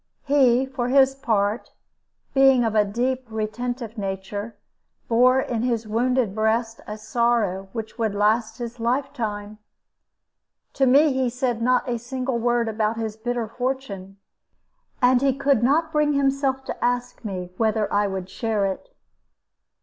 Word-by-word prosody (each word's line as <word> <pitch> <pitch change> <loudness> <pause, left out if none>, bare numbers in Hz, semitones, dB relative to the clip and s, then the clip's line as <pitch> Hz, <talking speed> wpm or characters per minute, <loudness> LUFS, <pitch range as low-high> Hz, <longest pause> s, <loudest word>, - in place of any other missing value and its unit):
He, 265 -3 +3
for 260 -2 -3
his 270 0 +5
part, 220 -4 -1 0.6
being 270 -2 +5
of 225 -2 0
a 215 -1 +4
deep, 250 +5 -2
retentive 225 +1 -4
nature, 200 +2 -5 0.5
bore 250 +3 +4
in 235 -3 -2
his 235 -2 -1
wounded 240 -1 +1
breast 225 +2 0
a 210 - -5
sorrow 215 -4 0
which 225 +2 -7
would 220 -3 0
last 220 +2 +1
his 240 -1 -6
lifetime. 230 -4 -2 1.1
To 270 -1 +2
me 285 +3 +5
he 260 -1 +1
said 245 -2 -2
not 250 +2 +2
a 240 -1 -1
single 255 +1 -3
word 240 0 +1
about 220 0 -1
his 220 -2 -3
bitter 240 0 -3
fortune, 230 -6 -4 0.9
and 250 0 +5
he 275 -1 +2
could 275 -4 +2
not 310 +6 +2
bring 300 -1 +2
himself 275 -1 +1
to - - -5
ask 245 0 -1
me 185 -4 -5
whether 220 -1 +1
I 205 0 +2
would 190 -2 -4
share 215 0 -1
it. 195 - -4
235 Hz, 145 wpm, -23 LUFS, 215-260 Hz, 1.1 s, his